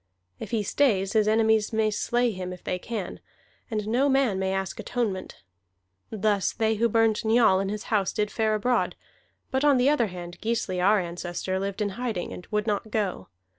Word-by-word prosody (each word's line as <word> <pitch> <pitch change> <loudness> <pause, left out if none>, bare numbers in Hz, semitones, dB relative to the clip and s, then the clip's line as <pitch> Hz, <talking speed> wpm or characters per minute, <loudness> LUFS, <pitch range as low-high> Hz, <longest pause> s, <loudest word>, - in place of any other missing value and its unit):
If - - -6
he 225 -3 0
stays, 195 -5 +1
his 215 -2 +3
enemies 220 -1 +3
may 220 -1 +1
slay 240 +3 +1
him 185 -2 -5
if 180 - -9
they 180 - -2
can, 210 -3 -5 0.5
and 215 -3 -2
no 255 +6 +2
man 265 -8 +2
may 190 0 0
ask 195 0 -3
atonement. 215 -7 -3 0.7
Thus 210 -2 0
they 220 0 +1
who 230 +2 +1
burned 225 0 +2
Njal 220 -4 +4
in 195 0 -1
his 210 0 -4
house 200 -3 +2
did 210 0 -1
fare 220 -1 +1
abroad; 245 +4 0 0.6
but 265 +1 0
on 290 -2 +5
the 250 +3 +4
other 255 -6 +2
hand 175 -2 -9
Gisli 220 -5 -1
our 205 +2 +5
ancestor 175 +1 -3
lived 200 +2 -2
in 205 - -1
hiding, 215 -3 -4
and 180 - -10
would 210 -1 0
not 210 0 -1
go. 200 - -2
215 Hz, 190 wpm, -26 LUFS, 190-230 Hz, 0.7 s, on